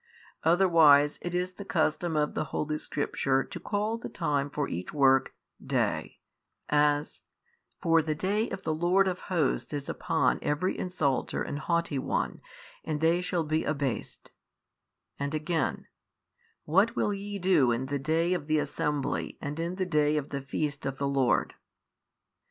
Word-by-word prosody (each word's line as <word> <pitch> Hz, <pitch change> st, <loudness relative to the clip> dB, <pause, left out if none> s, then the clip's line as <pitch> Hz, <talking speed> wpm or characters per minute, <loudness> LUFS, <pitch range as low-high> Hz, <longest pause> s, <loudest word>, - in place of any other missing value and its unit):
Otherwise, 160 Hz, -5 st, +5 dB
it 175 Hz, 0 st, -4 dB
is 180 Hz, +1 st, -1 dB
the 190 Hz, +2 st, -9 dB
custom 160 Hz, -2 st, 0 dB
of 150 Hz, 0 st, +1 dB
the -, -, -1 dB
holy 150 Hz, +1 st, -2 dB
Scripture 135 Hz, -2 st, 0 dB
to -, -, -8 dB
call 215 Hz, +2 st, -1 dB
the -, -, -6 dB
time 145 Hz, -4 st, -1 dB
for 145 Hz, 0 st, -2 dB
each 90 Hz, +2 st, -5 dB
work, 135 Hz, -2 st, +3 dB, 0.3 s
day, -, -, -1 dB, 0.5 s
as, 145 Hz, 0 st, +2 dB, 0.6 s
For 165 Hz, -2 st, +4 dB
the 155 Hz, 0 st, -2 dB
day 205 Hz, +7 st, 0 dB
of 195 Hz, -, -6 dB
the 155 Hz, -, 0 dB
Lord 180 Hz, +5 st, +3 dB
of 185 Hz, -1 st, -2 dB
Hosts 160 Hz, -5 st, 0 dB
is 145 Hz, -1 st, -4 dB
upon -, -, +1 dB
every 155 Hz, +6 st, 0 dB
insulter 155 Hz, -8 st, -1 dB
and 145 Hz, -, -4 dB
haughty 170 Hz, -4 st, 0 dB
one -, -, -2 dB, 0.4 s
and 155 Hz, -1 st, -2 dB
they 165 Hz, +3 st, +3 dB
shall 180 Hz, -2 st, -1 dB
be 155 Hz, +1 st, 0 dB
abased, 140 Hz, -4 st, -3 dB, 0.9 s
and 140 Hz, +2 st, -2 dB
again, 155 Hz, -1 st, -1 dB, 0.8 s
What 200 Hz, +9 st, +3 dB
will 210 Hz, -, +1 dB
ye 200 Hz, +1 st, -5 dB
do 175 Hz, -9 st, +3 dB
in 120 Hz, +3 st, -1 dB
the 140 Hz, +1 st, -2 dB
day 165 Hz, +5 st, +1 dB
of 160 Hz, -5 st, -3 dB
the 155 Hz, 0 st, +2 dB
assembly 150 Hz, -1 st, -2 dB
and 145 Hz, +3 st, -5 dB
in 170 Hz, +2 st, -2 dB
the 185 Hz, 0 st, -1 dB
day 150 Hz, -3 st, +2 dB
of 145 Hz, -1 st, -3 dB
the 140 Hz, -, -4 dB
feast 145 Hz, +1 st, -3 dB
of 135 Hz, 0 st, -4 dB
the 140 Hz, -, -1 dB
Lord? 135 Hz, -5 st, +1 dB
155 Hz, 160 wpm, -29 LUFS, 145-175 Hz, 0.9 s, Otherwise